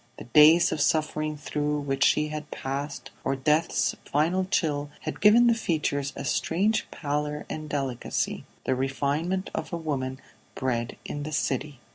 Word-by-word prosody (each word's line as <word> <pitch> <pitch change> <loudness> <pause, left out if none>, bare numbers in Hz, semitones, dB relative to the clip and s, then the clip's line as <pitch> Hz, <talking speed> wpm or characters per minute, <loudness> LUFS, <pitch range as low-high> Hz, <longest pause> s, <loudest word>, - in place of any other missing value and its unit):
The - - -8
days 155 +7 +6
of 150 - -1
suffering 155 0 +1
through 150 0 -2
which 135 -1 0
she 150 +2 +3
had 150 0 -6
passed, 140 +2 -5
or 135 - 0
death's 150 +5 +1
final 170 +6 +1
chill 145 -6 0
had - - -5
given 220 +4 +7
the 235 - +5
features 150 -9 -1
a - - -5
strange 200 +9 +1
pallor 150 0 -3
and 155 -1 -5
delicacy, 135 -4 -2 0.2
the 130 - +1
refinement 145 +8 -1
of - - -4
a 170 - -2
woman 135 -5 -3 0.4
bred 120 -3 -2
in 145 - -4
the 150 +2 -5
city. 140 -2 -2
150 Hz, 155 wpm, -27 LUFS, 140-160 Hz, 0.4 s, given